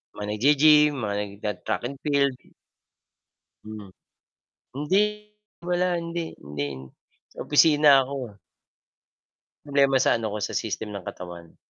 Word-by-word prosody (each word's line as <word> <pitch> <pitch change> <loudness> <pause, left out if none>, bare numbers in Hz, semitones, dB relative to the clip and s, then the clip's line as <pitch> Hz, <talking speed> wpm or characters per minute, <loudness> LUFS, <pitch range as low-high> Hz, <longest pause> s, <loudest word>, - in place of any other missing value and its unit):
Mga 105 - -7
naggi-gym, 150 +7 +5
mga 105 -2 -2
nagta-track 105 -2 -4
and 140 - -9
field. 140 -3 +1 1.2
Hmm. 105 -3 -10 0.8
Hindi 150 +8 +1 0.7
wala, 180 0 0
hindi 170 0 -5
hindi 70 -2 -6 0.5
sa - - -8
opisina 145 -3 +5
ako. 130 -6 -7 1.3
Problema 140 -2 +2
sa 130 -2 +3
ano 110 - -3
ko, 105 - -4
sa - - -3
system 110 -1 -4
ng 100 -3 -8
katawan. 85 -2 -9
130 Hz, 115 wpm, -25 LUFS, 105-150 Hz, 1.3 s, naggi-gym